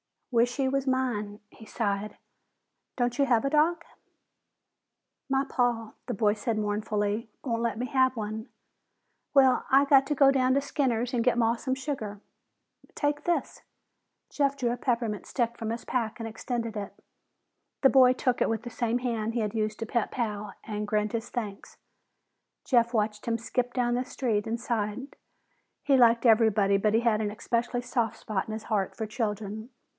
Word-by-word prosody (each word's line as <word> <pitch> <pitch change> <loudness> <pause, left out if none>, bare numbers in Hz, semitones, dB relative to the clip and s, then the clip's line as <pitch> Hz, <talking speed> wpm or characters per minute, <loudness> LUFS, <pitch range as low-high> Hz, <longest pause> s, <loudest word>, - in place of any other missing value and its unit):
"Wish 240 0 +2
he 270 -2 +1
was 270 0 -1
mine!" 235 -6 -1
he 220 - -15
sighed. 205 -2 -2 0.8
"Don't 245 +1 -1
you 280 - +5
have 240 -4 +3
a 275 - +1
dog?" 320 +3 +2 1.5
"My 270 0 +2
paw," 240 -4 0 0.2
the - - -2
boy 205 0 +2
said 220 +1 -2
mournfully, 210 +1 -1
"won't 230 -5 -1
let 235 -1 -1
me 245 - -2
have 260 0 +2
one. 215 0 -4 0.9
Well, 265 -3 +5
I 270 +1 +6
got 275 -1 +5
to 295 - 0
go 275 -1 +6
down 260 -1 +2
to 280 - +2
Skinner's 250 -4 -1
and 235 -2 +1
get 250 -1 +2
Maw 230 0 +3
some 260 +2 -2
sugar." 260 -7 -5 0.7
"Take 290 0 -1
this." 345 -1 -1 0.7
Jeff 280 -1 +1
drew 245 -3 0
a 245 - -2
peppermint 230 -6 -1
stick 235 -2 -1
from 225 - -4
his 230 +1 -4
pack 230 -3 -2
and 225 - -4
extended 230 0 -4
it. 200 -1 -5 0.9
The 270 - +6
boy 255 -2 +6
took 255 -1 0
it - - +3
with 225 0 -2
the 240 - -6
same 235 0 -1
hand 230 -3 -2
he 235 - 0
had 210 -1 -2
used 215 -1 -2
to 225 - -3
pet 230 0 -1
Pal 210 -4 -3
and 210 -1 -4
grinned 210 0 0
his 230 0 -3
thanks. 210 -5 -6 0.9
Jeff 235 -2 +2
watched 210 -1 -1
him 230 -1 +1
skip 245 +2 -2
down 240 -1 +1
the 250 +1 -1
street 225 -6 -1
and 230 +1 -2
sighed. 235 +2 -3 0.7
He 275 -2 +4
liked 235 -1 +5
everybody, 215 -3 +4
but 210 +1 +1
he 225 - +3
had 230 -3 +2
an 210 - -1
especially 240 +3 -1
soft 240 -2 -1
spot 205 -3 -3
in 215 - -5
his 220 0 -5
heart 205 -4 -1
for 220 - -3
children. 215 0 -4
235 Hz, 180 wpm, -28 LUFS, 215-255 Hz, 1.5 s, I